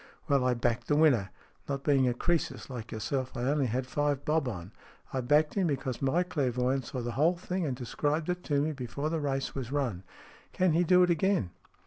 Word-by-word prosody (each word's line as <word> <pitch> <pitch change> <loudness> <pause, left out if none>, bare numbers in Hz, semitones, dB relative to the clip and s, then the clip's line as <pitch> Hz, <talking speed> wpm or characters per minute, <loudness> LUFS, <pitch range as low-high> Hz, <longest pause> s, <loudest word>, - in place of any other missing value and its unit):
"Well, 140 -3 +3
I 125 -1 +2
backed 120 0 -1
the 145 - +2
winner. 135 -11 +4 0.4
Not 140 -1 -2
being 135 -3 +3
a 120 - +1
Croesus 170 -1 -1
like 115 -3 -7
yourself, 125 +4 -3
I 120 - -2
only 140 +1 +1
had 125 +3 -1
five 145 +1 -1
bob 155 -2 +1
on. 95 -4 -5 0.4
I 130 - 0
backed 150 +4 +3
him, 190 -3 +1
because 130 -4 -2
my 140 +6 +2
clairvoyant 130 -6 0
saw 125 - -4
the 120 0 -3
whole 160 +8 +2
thing, 180 -1 -2
and 130 - -2
described 145 +5 -1
it 180 0 -2
to 145 -2 +1
me 155 +2 0
before 140 +2 -4
the 165 - 0
race 135 -2 -2
was 130 -2 -5
run." 130 -11 -1 0.5
"tan 185 -2 +2
he 170 +2 +3
do 180 +1 +5
it 180 - +3
again 170 - +1
140 Hz, 210 wpm, -30 LUFS, 125-155 Hz, 0.5 s, do